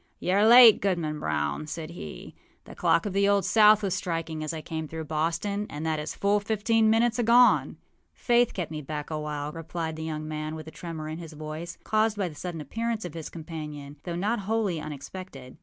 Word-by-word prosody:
âYou 180 Hz, -, 0 dB
are 205 Hz, +2 st, +4 dB
late, 235 Hz, -2 st, +9 dB
Goodman 170 Hz, -6 st, -1 dB
Brown,â 75 Hz, -, -2 dB
said 160 Hz, 0 st, -6 dB
he. 170 Hz, -, -9 dB, 0.3 s
âThe -, -, -11 dB
clock -, -, +2 dB
of 205 Hz, -, -3 dB
the 200 Hz, +1 st, +3 dB
Old 200 Hz, -2 st, +3 dB
South 210 Hz, +1 st, +6 dB
was 195 Hz, -3 st, 0 dB
striking 165 Hz, -4 st, -3 dB
as 155 Hz, -, -3 dB
I 160 Hz, -, -5 dB
came 160 Hz, 0 st, -5 dB
through 160 Hz, +1 st, -6 dB
Boston, 170 Hz, +7 st, -1 dB
and 150 Hz, +2 st, -5 dB
that 160 Hz, -1 st, 0 dB
is 150 Hz, -, -5 dB
full 205 Hz, +1 st, +2 dB
fifteen 220 Hz, +1 st, +2 dB
minutes 230 Hz, +2 st, +2 dB
agone.â 240 Hz, +1 st, +5 dB, 0.4 s
âFaith 240 Hz, -1 st, +3 dB
kept 175 Hz, -4 st, -3 dB
me 155 Hz, -1 st, -4 dB
back 150 Hz, +1 st, -6 dB
a 155 Hz, -, -2 dB
while,â 150 Hz, 0 st, -4 dB
replied 165 Hz, 0 st, -4 dB
the 160 Hz, -, -6 dB
young 155 Hz, -1 st, -4 dB
man, 155 Hz, 0 st, -4 dB
with 155 Hz, -1 st, -8 dB
a 160 Hz, -, -9 dB
tremor 160 Hz, -3 st, -7 dB
in 155 Hz, +1 st, -5 dB
his 165 Hz, -2 st, -9 dB
voice, 155 Hz, +3 st, -7 dB
caused 215 Hz, 0 st, +1 dB
by 195 Hz, -3 st, 0 dB
the 165 Hz, -, -8 dB
sudden 165 Hz, +1 st, -6 dB
appearance 225 Hz, -, -3 dB
of 175 Hz, -, -6 dB
his 165 Hz, -2 st, -6 dB
companion, 150 Hz, -3 st, -8 dB
though 175 Hz, -2 st, -5 dB
not 205 Hz, +6 st, 0 dB
wholly 200 Hz, -5 st, -1 dB
unexpected. 145 Hz, -2 st, -9 dB
165 Hz, 210 wpm, -27 LUFS, 155-205 Hz, 0.4 s, late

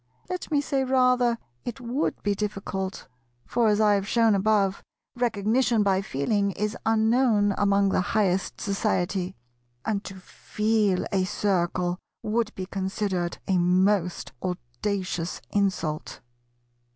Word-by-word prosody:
Let 365 Hz, -, -4 dB
me 295 Hz, -3 st, +2 dB
say 275 Hz, -2 st, 0 dB
rather 250 Hz, -2 st, +3 dB, 0.3 s
it 245 Hz, +2 st, -5 dB
would 250 Hz, +4 st, -2 dB
be 205 Hz, -, +2 dB
difficult: 195 Hz, -1 st, -4 dB, 0.4 s
for, 235 Hz, -2 st, +1 dB
as 210 Hz, -1 st, +3 dB
I 210 Hz, -1 st, +5 dB
have 200 Hz, -1 st, 0 dB
shown 230 Hz, -1 st, +4 dB
above, 200 Hz, -1 st, +2 dB, 0.3 s
Recognition 230 Hz, 0 st, +2 dB
by 195 Hz, -1 st, +2 dB
Feeling 200 Hz, +6 st, 0 dB
is 210 Hz, +2 st, -2 dB
unknown 220 Hz, -2 st, +3 dB
among 200 Hz, -1 st, +3 dB
the 190 Hz, -, +2 dB
highest 190 Hz, -1 st, 0 dB
society, 190 Hz, -2 st, -1 dB, 0.5 s
and 205 Hz, -2 st, -1 dB
to 195 Hz, -, -7 dB
feel 210 Hz, +1 st, 0 dB
a 190 Hz, -2 st, +2 dB
Circle 180 Hz, -2 st, 0 dB, 0.2 s
would 220 Hz, +1 st, 0 dB
be 185 Hz, -, -4 dB
considered 190 Hz, -2 st, -2 dB
a 185 Hz, -2 st, +2 dB
most 180 Hz, +1 st, +2 dB
audacious 180 Hz, -, -3 dB
insult. 185 Hz, -7 st, -1 dB
200 Hz, 125 wpm, -26 LUFS, 185-220 Hz, 0.5 s, I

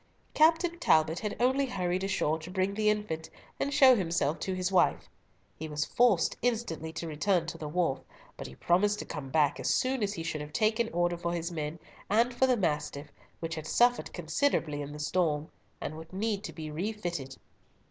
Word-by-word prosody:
Captain 335 Hz, +2 st, +3 dB
Talbot 160 Hz, -, +3 dB
had 210 Hz, -, -3 dB
only 265 Hz, +3 st, +2 dB
hurried 185 Hz, -5 st, -1 dB
ashore 175 Hz, -5 st, 0 dB
to 160 Hz, +2 st, -9 dB
bring 190 Hz, +1 st, 0 dB
the 215 Hz, +1 st, +2 dB
infant, 210 Hz, -7 st, -2 dB, 0.3 s
and 280 Hz, -, -1 dB
show 265 Hz, -2 st, +7 dB
himself 165 Hz, -6 st, 0 dB
to 190 Hz, -, -2 dB
his 185 Hz, +1 st, -1 dB
wife. 185 Hz, -, +2 dB, 0.5 s
He 160 Hz, -, -4 dB
was 150 Hz, -1 st, -2 dB
forced 235 Hz, -8 st, +3 dB
instantly 220 Hz, -10 st, -1 dB
to 165 Hz, -, -5 dB
return 165 Hz, +3 st, +1 dB
to 165 Hz, -, -6 dB
the 155 Hz, -, -5 dB
wharf, 150 Hz, -4 st, 0 dB, 0.4 s
but 70 Hz, -, -7 dB
he 65 Hz, -, -12 dB
promised 205 Hz, -, +2 dB
to -, -, -6 dB
come 145 Hz, -4 st, -6 dB
back 150 Hz, 0 st, +2 dB
as -, -, 0 dB
soon 260 Hz, -1 st, +1 dB
as 205 Hz, -1 st, 0 dB
he 165 Hz, -, -4 dB
should 155 Hz, -2 st, -3 dB
have 150 Hz, 0 st, -8 dB
taken 220 Hz, +1 st, +1 dB
order 175 Hz, 0 st, +1 dB
for 170 Hz, 0 st, -2 dB
his 170 Hz, 0 st, -3 dB
men, 155 Hz, -1 st, -4 dB, 0.3 s
and 230 Hz, +4 st, +3 dB
for 260 Hz, +2 st, +3 dB
the 250 Hz, -2 st, +3 dB
Mastiff, 150 Hz, -5 st, -2 dB, 0.3 s
which 165 Hz, 0 st, -3 dB
had 155 Hz, -1 st, -5 dB
suffered 245 Hz, +5 st, +3 dB
considerably 165 Hz, -, 0 dB
in 145 Hz, 0 st, -6 dB
the 150 Hz, -, -8 dB
storm, 150 Hz, -1 st, 0 dB, 0.3 s
and 155 Hz, -, -5 dB
would 160 Hz, +1 st, -10 dB
need 205 Hz, +1 st, -2 dB
to -, -, -5 dB
be 155 Hz, -2 st, -7 dB
refitted. 170 Hz, -6 st, -4 dB
175 Hz, 200 wpm, -30 LUFS, 155-215 Hz, 0.5 s, show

